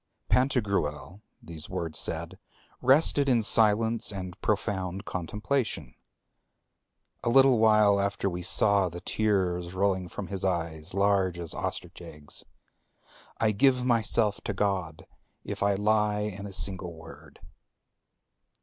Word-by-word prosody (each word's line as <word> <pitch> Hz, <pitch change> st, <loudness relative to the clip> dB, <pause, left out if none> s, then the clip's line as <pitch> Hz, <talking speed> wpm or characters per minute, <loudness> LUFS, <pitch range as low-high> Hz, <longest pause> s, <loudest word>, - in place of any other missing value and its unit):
—Pantagruel, 100 Hz, -, 0 dB, 0.2 s
these 80 Hz, -2 st, -7 dB
words 85 Hz, -4 st, -1 dB
said, -, -, -2 dB, 0.4 s
rested 140 Hz, +1 st, +4 dB
in 120 Hz, -3 st, +3 dB
silence 110 Hz, +1 st, +2 dB
and 90 Hz, -3 st, -6 dB
profound 95 Hz, -3 st, -2 dB
contemplation. 105 Hz, -, -3 dB, 1.3 s
A -, -, 0 dB
little 130 Hz, -1 st, +5 dB
while 105 Hz, -2 st, +4 dB
after 100 Hz, 0 st, -1 dB
we 90 Hz, -1 st, -3 dB
saw 95 Hz, +1 st, +2 dB
the 85 Hz, +1 st, -8 dB
tears 95 Hz, -4 st, -1 dB
rolling 95 Hz, -1 st, 0 dB
from 95 Hz, -, -7 dB
his 95 Hz, -2 st, -4 dB
eyes, 85 Hz, -2 st, -3 dB
large 100 Hz, -3 st, +2 dB
as 85 Hz, -2 st, -4 dB
ostrich -, -, -5 dB
eggs. 75 Hz, -1 st, -7 dB, 1.0 s
I 110 Hz, -1 st, +2 dB
give 125 Hz, +3 st, +2 dB
myself 110 Hz, -3 st, +1 dB
to 105 Hz, -, -2 dB
God 95 Hz, -5 st, -2 dB, 0.4 s
if -, -, -6 dB
I 100 Hz, 0 st, +2 dB
lie 105 Hz, 0 st, +1 dB
in 100 Hz, -1 st, -5 dB
a 100 Hz, -, -10 dB
single 95 Hz, -3 st, 0 dB
word." 80 Hz, 0 st, -14 dB
100 Hz, 120 wpm, -27 LUFS, 90-110 Hz, 1.3 s, little